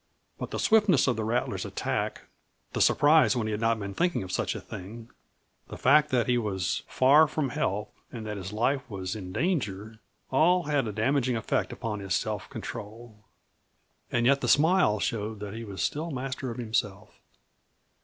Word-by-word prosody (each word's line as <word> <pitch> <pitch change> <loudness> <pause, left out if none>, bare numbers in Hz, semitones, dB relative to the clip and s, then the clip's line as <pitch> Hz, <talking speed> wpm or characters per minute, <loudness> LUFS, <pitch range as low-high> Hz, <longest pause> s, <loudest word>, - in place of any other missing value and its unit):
But - - -4
the - - -4
swiftness 210 - +4
of 125 - +1
the 110 - -3
rattler's 115 +3 -1
attack, - - -3 0.5
the - - -1
surprise 150 0 +5
when 115 -3 -1
he 110 - -2
had 105 +1 -3
not 115 0 +2
been 100 -2 -5
thinking 175 - 0
of 95 - -7
such - - -1
a - - -4
thing, 110 +5 -9 0.6
the - - -8
fact 150 +3 +4
that 125 -4 +2
he 125 -1 +2
was 95 -6 -2
far 145 +5 +5
from 150 -2 -2
help 105 -7 -2 0.2
and 115 -3 -7
that 105 0 -4
his 95 0 -6
life 130 +6 +1
was 95 -2 -4
in 95 -4 -7
danger 110 - -2 0.3
all 175 +6 +4
had 145 -5 0
a - - -2
damaging 125 +4 +1
effect 110 - -1
upon 105 -2 -4
his 95 -4 -1
self - - -3
control. 110 +1 -8 0.9
And 120 -1 +1
yet 140 +2 +4
the - - -1
smile 155 - +4
showed 110 0 -2
that 105 -1 -6
he 115 +1 -6
was 100 -3 -5
still 160 +3 -2
master 130 -2 -4
of 115 - -6
himself. 110 -3 -3
115 Hz, 185 wpm, -28 LUFS, 105-140 Hz, 0.9 s, surprise